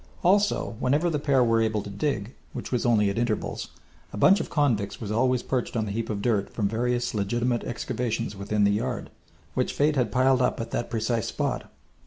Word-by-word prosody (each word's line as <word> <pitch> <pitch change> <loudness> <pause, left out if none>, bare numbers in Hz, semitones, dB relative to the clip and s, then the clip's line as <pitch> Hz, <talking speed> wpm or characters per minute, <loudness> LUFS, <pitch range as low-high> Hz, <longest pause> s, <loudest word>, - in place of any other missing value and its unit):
Also 200 - +2
whenever 150 +7 +2
the 150 - 0
pair 140 -3 +3
were 115 -1 +3
able 110 -2 0
to 105 - -7
dig, 105 +1 -2 0.2
which - - -6
was 125 -2 +1
only 105 -4 +3
at 100 - -2
intervals, 120 -3 -2 0.4
a - - -7
bunch 195 - +6
of - - -4
convicts 120 -10 0
was 105 -3 -5
always 125 +3 +2
perched 125 -2 -2
on 110 - 0
the 100 - -4
heap 115 +2 -3
of 100 -2 -3
dirt 105 -5 +1
from 105 -3 0
various 120 +3 -1
legitimate 120 +4 0
excavations 115 -2 -3
within 100 +2 0
the 100 - +4
yard, 120 +3 -2 0.4
which - - 0
Fate 150 +1 +2
had 125 -6 +1
piled 130 +1 +3
up 125 - +1
at 115 0 -5
that 120 - -2
precise 115 -1 -1
spot. - - -2
120 Hz, 205 wpm, -26 LUFS, 105-130 Hz, 0.4 s, bunch